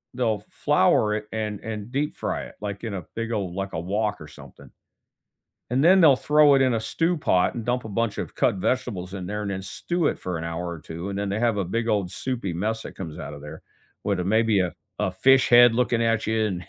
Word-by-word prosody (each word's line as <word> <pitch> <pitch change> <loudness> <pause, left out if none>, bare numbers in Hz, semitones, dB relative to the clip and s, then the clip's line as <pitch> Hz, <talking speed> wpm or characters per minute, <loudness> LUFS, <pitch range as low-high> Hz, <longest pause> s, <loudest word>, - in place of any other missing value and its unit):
they'll 110 -5 0
flour 105 0 +2
it 105 0 -5
and 105 -2 -3
and 110 0 -6
deep-fry 145 +3 -2
it, - - -13
like 100 0 -5
in 110 -3 -4
a 90 - -6
big 115 0 -3
ole 95 -5 -2
like 95 0 -4
a 80 - -2
wok 105 +4 -1
or 75 - -9
something, 75 - -14 1.0
and 130 +4 +1
then 185 +3 +6
they'll 145 -5 +7
throw 150 +1 +5
it 135 - +3
in 130 -2 +3
a 115 - +1
stew 165 +9 0
pot 90 -11 +2
and 115 -2 -5
dump 125 -1 -1
a - - -6
bunch 115 +1 -1
of - - -5
cut - - +2
vegetables 95 -3 -2
in 95 -2 -5
there 105 +2 -3
and 100 - -3
then 95 - -4
stew 165 - -2
it - - -2
for 90 -2 -4
an 80 - -5
hour 85 +1 -4
or 85 -2 -6
2 85 +5 -7
and 100 - -4
then 100 -1 -2
they 100 - -1
have 115 -3 +1
a 95 - 0
big 115 +5 -2
old 100 -5 0
soupy 115 -8 -3
mess 110 +6 -2
that - - -9
comes 80 -5 -7
out - - -6
of 70 - -10
there 75 +2 -9 0.4
with, 100 -3 0
uh, 90 - -1
maybe 110 +1 +2
a 90 -2 -2 0.3
a - - 0
fish 130 +7 +4
head 120 -1 +8
looking 120 -1 +1
at 115 -1 +1
you 110 0 +1
and 90 -5 -3
105 Hz, 250 wpm, -24 LUFS, 95-120 Hz, 1.0 s, head